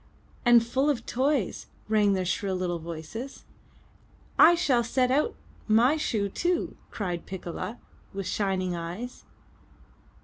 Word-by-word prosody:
*' - - -32 0.2
'*And 240 -1 +6
full 265 +5 +1
of 245 -5 -1
toys!*' 265 -4 0 0.2
rang 210 -2 +3
their 185 -1 0
shrill 190 +1 -1
little 180 -2 -2
voices. 170 - -7 0.9
'1 345 - +8
shall 275 -9 +2
set 250 +2 +1
out 300 - +2 0.3
my 235 +7 +5
shoe 220 -9 0
too!" 345 - -1
cried 180 -5 -4
Piccola 190 +4 -5 0.3
with 195 0 -5
shining 185 -3 -1
eyes. 175 +9 -6
215 Hz, 130 wpm, -27 LUFS, 185-255 Hz, 0.9 s, 1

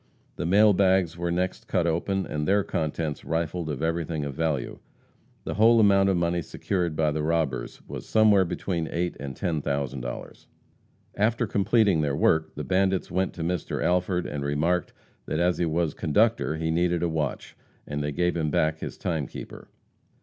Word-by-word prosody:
The - - -3
mail 105 +3 +6
bags 95 -3 +2
were 85 0 -2
next 90 +2 -2
cut 90 -3 +1
open 95 +4 0
and 75 0 -3
their 100 +1 +3
contents 80 -2 -3
rifled 85 0 -2
of 75 +1 -3
everything 80 -2 -1
of 70 - -4
value. 75 -3 -2 0.6
The - - -3
whole 115 +2 +5
amount 100 -2 +5
of 95 - +2
money 85 0 0
secured 85 0 -2
by 75 -1 +2
the 75 +1 -2
robbers 75 -6 -1
was - - -7
somewhere 105 -3 +5
between 85 -2 -3
eight 85 +1 -1
and 70 -2 -6
ten 85 -4 -1
thousand 70 -2 -2
dollars. - - -7 0.7
After 115 +4 +1
completing 100 -3 +2
their 70 -2 0
work 80 +2 +2
the - - -4
bandits 95 0 +1
went 95 +1 0
to 85 - -5
Mr. 90 -1 -2
Alford 90 0 +1
and 75 -1 -4
remarked 80 +5 0 0.4
that 75 - -1
as 90 0 +2
he 85 - +1
was 80 -1 0
conductor 105 +2 +1
he 80 0 -1
needed 85 0 +1
a - - +2
watch, 80 -4 -3 0.3
and 75 0 -4
they 75 - -2
gave 90 +4 0
him 80 -3 0
back 80 +2 +1
his - - -6
timekeeper. 80 -6 -5
85 Hz, 180 wpm, -26 LUFS, 75-95 Hz, 0.7 s, mail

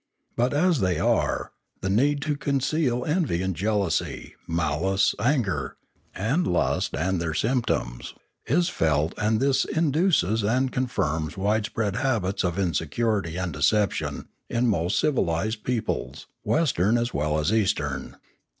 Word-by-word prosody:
But, 120 +2 +1
as 165 +1 +2
they 90 -4 +1
are, - - 0 0.3
the 95 - -1
need 140 +7 +2
to 150 +1 0
conceal 140 -2 0
envy 150 - 0
and 95 -1 -1
jealousy, 100 -3 -1
malice, 85 +4 +1
anger, 105 - 0 0.4
and 135 - 0
lust 90 - 0
and 90 +1 0
their 80 -2 -2
symptoms, 115 - -1 0.3
is 170 +6 +2
felt, 80 +1 +1
and 110 0 +1
this 135 0 +2
induces 155 - +1
and 125 +5 +1
con 130 0 0
firms 80 -8 -2
wide 105 +2 +1
spread 105 -2 -2
habits 115 -9 0
of 90 -1 -1
insincerity 95 +1 -1
and 90 -3 -2
deception 100 +9 0 0.2
in 120 +1 +1
most 95 -4 +1
civilised 110 - 0
peoples, 125 -3 -3 0.2
Western 120 - +2
as 120 +1 -1
well 75 +1 0
as 75 +7 +1
Eastern. 95 -11 -1
105 Hz, 135 wpm, -25 LUFS, 85-130 Hz, 0.4 s, as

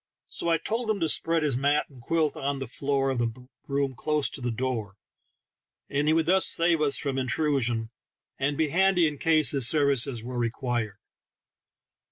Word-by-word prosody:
So 170 - -3
I 165 - +3
told 225 +8 -3
him 215 -2 0
to 165 - +2
spread 165 +1 +2
his 145 -4 +1
mat 145 +3 +1
and 130 -4 -16
quilt 160 +4 0
on 140 0 -3
the 135 - -5
floor 135 +2 -1
of 130 - -2
the 115 -1 0 0.4
room 140 -1 -1
close 150 +3 0
to 140 - -6
the 120 - -2
door, 115 -4 -3 1.0
and 145 +1 0
he 155 - +4
would 165 -1 +2
thus 190 +2 +4
save 165 -1 +3
us 145 -2 +4
from 135 -2 -2
intrusion, 125 -4 0 0.5
and 140 +1 -1
be 160 -2 +1
handy 190 +1 +3
in 145 -2 -5
case 155 -3 +3
his 135 -4 +1
services 140 -5 +1
were 125 0 -5
required. 120 -3 -2
140 Hz, 185 wpm, -26 LUFS, 125-155 Hz, 1.0 s, he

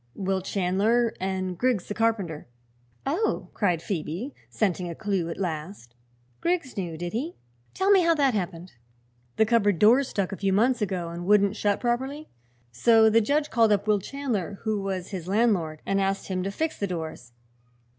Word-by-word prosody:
"Will 190 -1 -1
Chandler, 205 +6 +1
and 185 -1 -2
Griggs 245 -2 0
the - - -3
carpenter." 205 - -1 0.6
"Oh!" 335 +11 -1
cried 175 -6 0
Phoebe, 180 - -4 0.2
scenting 180 -4 -1
a 170 - -6
clew 195 -4 -1
at 165 - -5
last. 160 - -5 0.5
"Griggs 340 -6 -1
knew, 175 -5 -4
did 175 +1 -5
he? 290 +10 -3 0.4
Tell 385 +2 +2
me 390 -2 +7
how 335 -1 +3
that 275 -4 +2
happened." 180 -3 -4 0.6
"The 220 - +4
cupboard 210 -4 +3
doors 240 - +5
stuck, 200 -2 -2
a 195 - -5
few 195 -1 0
months 240 +4 +2
ago, 185 -4 -2
and 170 +1 -6
wouldn't 200 0 +4
shut 205 -2 0
properly. 265 +5 -2 0.4
So 220 - +5
the 230 +1 +5
judge 290 +6 0
called 225 -3 +4
up 205 -1 +2
Will 210 -1 +3
Chandler, 210 - -3
who 215 -2 -1
was 190 -2 -3
his 180 -4 -6
landlord, 190 -7 +1
and 195 0 +1
asked 195 +1 -1
him 185 -1 -1
to 195 +2 -2
fix 315 +10 -2
the 200 - -1
doors. 160 -8 -6
200 Hz, 175 wpm, -26 LUFS, 180-235 Hz, 0.6 s, me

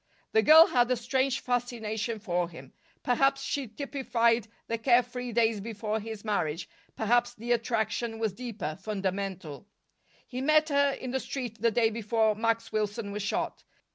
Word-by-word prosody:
The 220 - +4
girl 315 +7 +9
had 245 -4 +2
a 255 - +3
strange 260 +3 0
fascination 235 -3 -2
for 180 -4 -1
him. 135 -6 -12 0.3
Perhaps 275 +2 +2
she 280 -3 -2
typified 235 -3 0 0.2
the 230 0 -3
care 245 +1 +4
free 245 0 -6
days 225 -2 +2
before 220 0 -3
his 220 0 -8
marriage; 165 -6 -1 0.3
perhaps 240 +2 +1
the 235 +2 -5
attraction 230 -1 0
was 220 -3 -1
deeper, 210 -8 -5
fundamental. 195 -5 -4 0.6
He 255 0 -5
met 310 +2 +4
her 280 -1 +3
in 255 -2 -6
the 265 - 0
street 245 -6 -5
the 230 - +4
day 225 0 +2
before 220 0 +1
Max 230 +1 -1
Wilson 210 0 -2
was 210 +1 -4
shot. 205 - -2
230 Hz, 160 wpm, -29 LUFS, 210-245 Hz, 0.6 s, girl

